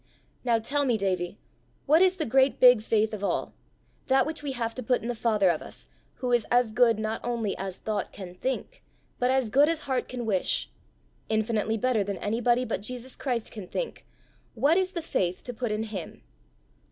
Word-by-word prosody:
"Now 240 -2 +3
tell 280 +6 0
me, 245 -5 +2
Davie, 185 -3 -1 0.5
what 310 +4 +5
is 375 0 +5
the 320 -4 -2
great 265 +3 +3
big 250 -3 +7
faith 220 0 +1
of 205 -1 -5
all - - -1 0.5
that 265 0 +4
which 315 +1 -4
we 285 -2 -3
have 230 -2 -2
to 255 - -5
put 250 0 0
in - - -4
the 245 - -1
Father 215 -5 +2
of 160 - -3
us, - - -10 0.3
who 250 -1 -3
is 240 -2 +2
as 245 -2 +3
good 230 -1 +4
not 220 +1 -2
only 230 -4 -1
as 190 -1 -4
thought 215 -1 -3
can 185 -3 -9
think, 265 - -4 0.4
but 250 - +2
as 260 -4 +1
good 285 +5 +5
as 330 -1 -1
heart 260 -3 -1
can 245 -2 -4
wish 195 -5 0 0.6
infinitely 220 0 0
better 245 -2 +1
than 200 -1 -4
anybody 240 +5 +1
but 215 -4 -2
Jesus 250 +3 -4
Christ 245 -5 -2
can 205 -5 -8
think - - -4 0.5
what 295 +4 +3
is 375 0 +1
the 340 - -3
faith 180 - -1
to 245 - -6
put 240 -1 -3
in 215 +1 -1
him?" 205 -6 -7
235 Hz, 200 wpm, -27 LUFS, 215-260 Hz, 0.6 s, big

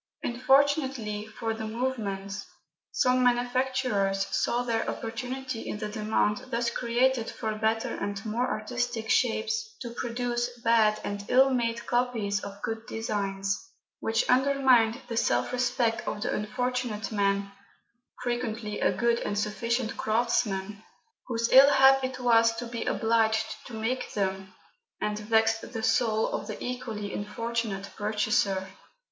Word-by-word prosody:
Unfortunately 260 -4 +1
for 225 +1 -3
the 220 0 -5
movement, 210 -5 -3 0.5
some 255 0 +3
manufacturers 245 -5 +1
saw 245 +1 +1
their 230 -2 -1
opportunity 250 +2 -4
in - - -3
the 210 0 -4
demand 210 -1 0
thus 235 -1 0
created 240 0 +1
for 220 -2 -3
better 220 +1 0
and 200 0 -4
more 235 +4 0
artistic 235 0 -2
shapes 440 - +1
to 240 - -6
produce 240 0 -2
bad 220 -2 +4
and 200 0 -4
ill 265 +2 +5
made 235 -2 -1
copies 235 -5 0
of 200 0 -9
good 225 0 -3
designs, 200 -3 -2 0.4
which 225 0 0
undermined 255 -3 +4
the 230 - -4
self 120 - +1
respect 245 -2 0
of 210 - -3
the - - -1
unfortunate 245 0 -2
man 200 -1 0 0.7
(frequently 230 -3 -2
a - - +3
good 235 -1 +1
and 205 - -3
sufficient 230 +3 -1
craftsman) 215 -3 0 0.5
whose 230 -1 -1
ill 270 +2 +9
hap 270 -1 +6
it 260 0 -3
was 230 -2 +4
to 240 +1 -5
be 235 -1 -5
obliged 225 -1 +1
to 240 - -8
make 235 +4 -2
them, 190 -1 -2 0.5
and 210 0 -2
vexed 225 +2 +1
the 225 -1 -4
soul 220 -1 +2
of - - -4
the - - -5
equally 225 -5 -4
unfortunate 210 -1 -3
purchaser. 210 -2 0
230 Hz, 135 wpm, -28 LUFS, 210-245 Hz, 0.7 s, ill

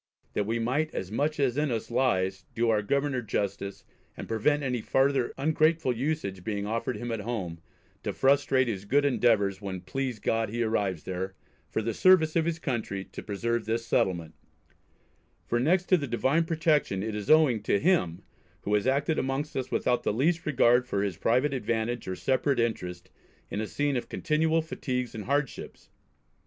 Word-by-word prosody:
that 105 - -1
we 115 +1 0
might 130 +7 0
as 95 - -4
much 150 +7 -1
as 135 -2 +1
in 150 -1 +1
us 115 -1 -3
lies, 95 -7 +1
do 115 0 +2
our 105 -1 +2
Governor 140 +4 0
justice, 100 -2 -3 0.3
and - - -6
prevent 145 +7 +1
any 125 -3 -1
farther 135 +1 +2
ungrateful 155 -1 +2
usage 120 - -2
being 100 -1 -2
offered 115 +4 -2
him 120 0 -4
at 115 - -2
home, 100 -7 -4 0.4
to - - -2
frustrate 135 -1 +3
his 100 -4 -3
good 140 +7 +3
endeavours 105 -7 +2
when 95 -2 -4
please 130 +6 -3
God 110 +1 0
he 120 +2 -1
arrives 100 -7 -1
there, 95 +1 -4 0.3
for 110 - -2
the 115 +1 -1
service 160 - +5
of 165 -1 +3
his 170 -1 -1
country, 110 -10 -3
to - - -7
preserve 115 +2 -2
this 115 +1 -1
settlement; 85 -4 0 1.1
for 120 - 0
next 175 +8 +2
to 185 - +6
the 145 -4 -3
Divine 135 +7 +1
protection, 155 - +1
it 110 0 -3
is 105 -1 -5
owing 150 -8 +5
to 100 -1 +1
him, 145 - +1 0.4
who 105 - -2
has 105 +3 +2
acted 140 +4 +1
amongst 135 +3 -2
us 130 -1 -2
without 125 -1 +1
the - - 0
least 160 +10 +1
regard 125 -3 +4
for 100 -5 0
his 100 -3 -2
private 130 - +1
advantage 120 -2 -2
or 95 - -2
separate 130 +4 +1
interest, 90 -6 -2 0.4
in 105 - -2
a 110 - -3
scene 145 +3 -1
of 125 - -3
continual 160 0 +1
fatigues 125 -6 -3
and 110 -2 -6
hardships. 140 0 -3
120 Hz, 180 wpm, -28 LUFS, 105-145 Hz, 1.1 s, to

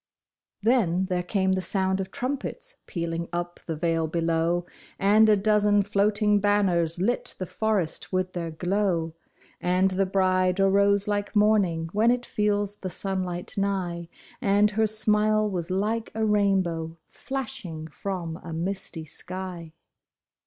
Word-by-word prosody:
Then 195 -6 +2
there 180 -1 -1
came 190 +1 0
the 190 0 +1
sound 190 +1 0
of 190 - -5
trumpets 285 - -4
pealing 170 -1 -3
up 175 0 -4
the 165 - -2
vale 165 0 0
below, 165 +1 0 0.3
And 210 +3 +5
a 210 - +5
dozen 205 0 +3
floating 210 +1 +2
banners 190 -5 +2
lit 215 +8 -1
the 185 - -3
forest 205 -4 -1
with 185 -1 -1
their 170 -2 -3
glow, 175 -1 -1 0.5
And 185 +2 +2
the 190 +1 +1
bride 185 -1 +2
arose 200 +1 +3
like 205 +1 -2
morning, 200 -6 +3
v/hen 220 +3 +3
it 245 0 +1
feels 205 -1 0
the 185 - -5
sunlight 185 -1 -3
nigh, 180 -4 -2 0.3
And 205 -2 +3
her 220 +1 +2
smile 215 0 +3
was 180 -4 -3
like 215 +5 -1
a 220 0 +1
rainbow 190 -6 +1
flashing 195 - -6
from 170 -2 -5
a 165 - -7
misty 170 -1 -4
sky. 175 +1 -7
190 Hz, 140 wpm, -26 LUFS, 175-210 Hz, 0.5 s, And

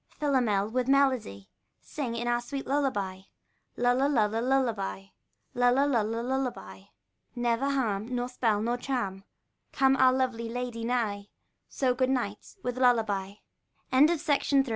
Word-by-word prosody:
Philomel, 245 -9 +1
with 250 +3 -1
melody, 255 - +1 0.3
Sing 255 -6 -5
in 235 +1 -3
our 240 0 +1
sweet 270 +3 -6
lullaby; 205 -10 -1 0.6
Lulla, 245 +3 +2
lulla, 225 -5 +1
lullaby; 235 -7 0 0.5
lulla, 245 +2 +3
lulla, 230 -4 0
lullaby: 240 - -4 0.5
Never 240 +2 0
harm, 225 -7 -1
Nor 245 0 -1
spell, 225 -4 0
nor 240 +2 0
charm, 200 -8 -3 0.5
Come 270 0 +3
our 260 0 +6
lovely 250 -3 -1
lady 245 -1 -4
nigh; 220 -4 -1 0.4
So, 260 -2 0
good 255 +1 0
night, 235 -6 -3
with 250 0 -3
lullaby. 215 -6 +1
245 Hz, 120 wpm, -28 LUFS, 215-260 Hz, 0.6 s, our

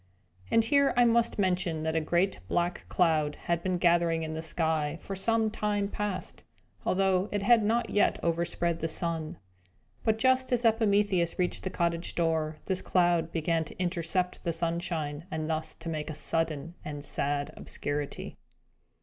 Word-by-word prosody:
And 225 - +4
here 280 +3 +3
I 245 - +6
must 235 0 +2
mention 180 -5 0
that 160 0 -1
a 160 - +2
great 175 +5 +1
black 175 +1 -1
cloud 155 -4 +2
had 170 -1 0
been 185 0 0
gathering 170 -2 +3
in 155 0 -4
the 160 - -3
sky, 160 -1 0
for 195 - -6
some 220 +2 +1
time 205 -2 -1
past, 210 -2 -4 0.4
although 190 +1 +2
it 205 -1 -1
had 235 +2 +6
not 230 +2 +1
yet 205 - +3
overspread 170 0 0
the 165 - -1
sun. 165 -1 -1 0.7
But, 220 -1 +2
just 260 +2 +2
as 245 -1 +1
Epimetheus 205 -6 +2
reached 180 -1 -1
the 190 - -3
cottage 170 -1 -1
door, 160 -2 0
this 190 -1 -1
cloud 175 -2 +2
began 165 0 0
to - - -12
intercept 180 0 -1
the 170 - -1
sunshine, 165 -2 -2
and 160 -3 -3
thus 155 -1 -2
to 165 - -11
make 155 -2 -3
a 155 - -5
sudden 165 +1 -2
and 145 -1 -6
sad 145 0 -1
obscurity. 145 0 -5
170 Hz, 165 wpm, -29 LUFS, 160-200 Hz, 0.7 s, I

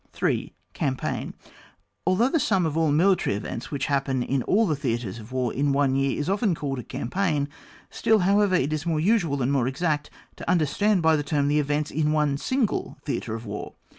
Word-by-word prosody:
8. - - +1
— - - -44
Campaign, 130 -2 -2 0.7
Although 200 +8 +3
the 325 - +1
sum 195 - +2
of 155 -2 -2
all 160 -2 +2
military 175 - +3
events 115 +3 -5
which 140 -2 -2
happen 135 -2 0
in 135 +1 0
all 215 - +2
the 160 -6 +1
Theatres 120 -6 -3
of 110 +2 -12
War 130 -2 -1
in 140 +1 +1
one 135 -1 +2
year 135 0 0
is 145 - -2
often 200 -1 +1
called 140 -3 -3
a - - -6
Campaign, 150 - -1 0.4
still, 220 - +3
however, 200 0 +3
it 155 -3 +1
is 155 -1 -2
more 160 -2 +1
usual 165 - +2
and 130 - +1
more 130 -3 +2
exact 150 +2 -1 0.3
to - - -6
understand 180 +4 +2
by 160 0 +5
the 150 - 0
term 145 -1 0
the 150 +1 +3
events 150 +1 -1
in 150 0 +1
one 150 -2 +2
single 255 - -1
Theatre 120 -6 -3
of 115 +1 -7
War. 105 0 -6
150 Hz, 205 wpm, -25 LUFS, 135-180 Hz, 0.7 s, by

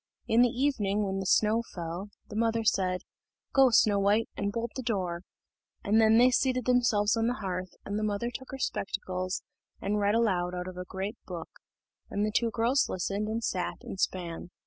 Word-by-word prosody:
In 230 +2 +4
the 245 - +5
evening, 225 -6 0
when 195 -1 -2
the 190 - -3
snow 220 +4 +3
fell, 175 +3 -5 0.2
the 210 - -9
mother 225 0 +1
said, 185 -4 +1 0.5
"Go, 270 -1 +6
Snow 210 -3 +4
white, 205 +3 +2
and 200 0 -1
bolt 230 +2 -3
the 260 - -3
door;" 185 -8 -2 0.6
and 215 +2 +4
then 220 0 +6
they 250 +2 +6
seated 255 0 +1
themselves 235 -4 +3
on 225 0 +1
the 245 - 0
hearth, 185 -4 -4
and 205 +1 -2
the - - -2
mother 215 +3 -1
took 260 - -7
her 270 - -6
spectacles, 185 -6 -3 0.4
and 210 +1 -1
read 205 +1 +2
aloud 180 -6 +1
out 180 0 -4
of 185 - -7
a 180 - -5
great 195 +5 -5
book, 170 -3 -6 0.6
and 205 +1 0
the 215 - -1
two 230 +2 +2
girls 235 +5 +2
listened, 200 +3 -2
and 225 +1 -2
sat 180 -4 -2
and 190 - -7
span. 175 -2 -2
210 Hz, 195 wpm, -29 LUFS, 185-230 Hz, 0.6 s, Go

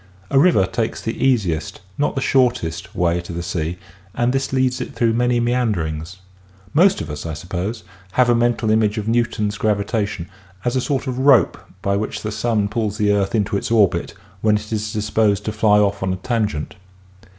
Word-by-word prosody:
A 135 - +5
river 150 - +5
takes 110 +4 -2
the 115 - -4
easiest, 95 -12 0 0.2
not 145 - 0
the 135 - -1
shortest, 100 -11 0
way 85 0 +1
to 85 - -9
the 85 0 -4
sea 85 0 -3 0.4
and 120 +1 +1
this 135 0 -1
leads 130 -1 +1
it - - -6
through 115 -1 +2
many 120 +1 +2
meanderings. 95 -9 -1 0.6
Most 180 +5 +4
of 75 - -5
us, 75 - -6
I 80 - -4
suppose, 95 +7 -4 0.3
have 125 -1 +4
a 120 - +4
mental 120 -2 +1
image 110 0 +2
of 105 0 -3
Newton's 110 -3 0
gravitation 100 -3 -1 0.4
as 120 +1 0
a 130 - +2
sort 135 +1 -1
of 130 -1 -3
rope 135 -4 +5 0.3
by 100 0 +1
which 110 - -4
the 105 - -3
sun 110 -1 0
pulls 105 -1 -2
the 105 -2 +2
earth 100 +2 +1
into 105 -2 0
its 100 - -2
orbit 100 -7 +2 0.3
when 105 -1 +3
it 105 +1 -7
is 105 0 -2
disposed 105 -1 +1
to 110 - -1
fly 105 -1 +3
off 100 -1 +2
on 95 0 0
a - - 0
tangent. 105 -6 -2
105 Hz, 195 wpm, -20 LUFS, 95-120 Hz, 0.6 s, A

